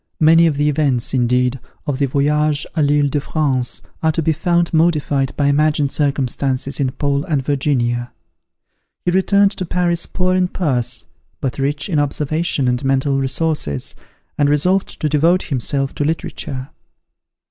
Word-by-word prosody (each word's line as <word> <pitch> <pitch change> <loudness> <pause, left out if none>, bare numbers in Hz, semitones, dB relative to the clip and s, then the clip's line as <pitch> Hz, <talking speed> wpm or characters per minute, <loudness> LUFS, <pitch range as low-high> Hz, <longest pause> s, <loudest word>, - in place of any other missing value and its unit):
Many 165 +2 +6
of 150 -3 -1
the 145 +1 +2
events, 140 -5 +1
indeed, 125 0 +1 0.3
of 140 -3 -2
the 140 - +2
"Voyage 150 +2 +1
à - - -12
l'Ile 145 -1 +3
de 145 - 0
France," 135 -5 -1 0.2
are 160 - +3
to 165 - -1
be 160 +1 +2
found 170 +2 0
modified 150 -5 +1
by 145 - +1
imagined 145 0 +2
circumstances 135 -1 -1
in 135 -2 +1
"Paul 140 0 0
and 145 -5 -1
Virginia." 125 -4 0 0.9
He 175 - +2
returned 200 +2 +3
to 190 - -5
Paris 175 -1 -1
poor 185 0 0
in 185 0 +2
purse, 140 -10 -2 0.3
but 135 0 -3
rich 145 +2 -1
in 165 -6 0
observation 145 0 0
and 125 +2 0
mental 135 +1 +1
resources, 135 - -1 0.5
and 145 -1 +3
resolved 180 +7 +1
to 155 - +1
devote 165 +5 +2
himself 135 0 -1
to - - -2
literature. 140 -3 -4
145 Hz, 155 wpm, -18 LUFS, 135-160 Hz, 0.9 s, Many